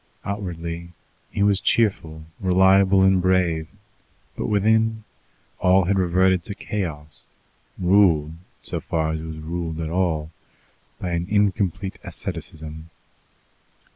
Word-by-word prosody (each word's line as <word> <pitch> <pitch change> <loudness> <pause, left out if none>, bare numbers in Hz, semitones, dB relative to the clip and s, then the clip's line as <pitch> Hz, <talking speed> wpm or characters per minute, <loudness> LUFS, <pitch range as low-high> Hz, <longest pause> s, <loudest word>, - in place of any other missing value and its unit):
Outwardly 85 -4 -5 0.4
he 100 - -1
was 100 -1 +3
cheerful, 80 -10 0
reliable, 95 +1 +4
and 95 -1 +4
brave; 90 -4 +1 0.7
but - - -3
within, 110 +2 +2 0.6
all 95 0 +4
had 95 +2 +1
reverted 90 0 +2
to 100 - -6
chaos, 75 -10 -5 0.5
ruled, 90 -5 +3 0.3
so - - -3
far 80 -1 -1
as 80 - -3
it 80 - -7
was 80 -1 -7
ruled 80 0 -4
at 80 -1 -3
all, 80 -4 0 0.7
by 90 - -3
an 85 0 -1
incomplete 100 -2 0
asceticism. 80 0 -7
90 Hz, 115 wpm, -23 LUFS, 80-95 Hz, 0.7 s, reliable